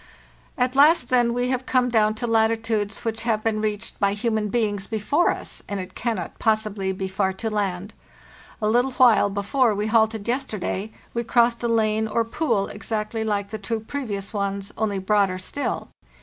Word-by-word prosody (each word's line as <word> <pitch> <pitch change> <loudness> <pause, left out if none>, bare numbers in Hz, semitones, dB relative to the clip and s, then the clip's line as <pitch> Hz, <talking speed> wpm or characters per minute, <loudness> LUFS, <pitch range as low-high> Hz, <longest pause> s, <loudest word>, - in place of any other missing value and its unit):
At 250 0 +1
last, 290 -1 +5
then, 245 -2 +3
we 245 +1 0
have 255 0 -2
come 250 -1 +2
down 215 -2 +3
to 220 - -3
latitudes 225 -2 0
which 225 0 -2
have 220 -2 0
been 220 -1 0
reached 215 +1 -3
by 200 -1 +2
human 215 0 -1
beings 205 -3 -1
before 230 +10 +1
us, - - -4
and 200 -1 -2
it 185 - -7
cannot 230 -1 -3
possibly 215 -3 0
be 190 0 -3
far 190 0 0
to 220 +3 -4
land. 200 -1 -2 0.7
A - - +3
little 245 +4 +2
while 240 -6 +5
before 205 +4 +1
we 205 +1 -1
halted 220 -1 +2
yesterday 220 -5 -2 0.2
we 235 - -1
crossed 235 0 +2
a 240 - 0
lane 220 -1 +1
or 230 +1 0
pool 230 -5 0
exactly 220 0 -3
like 205 -2 -1
the 220 - -4
two 220 +3 -2
previous 220 -5 -5
ones, 200 -1 -2
only 210 -2 -1
broader 195 -1 +2
still. 230 +10 -3
220 Hz, 175 wpm, -24 LUFS, 205-235 Hz, 0.7 s, last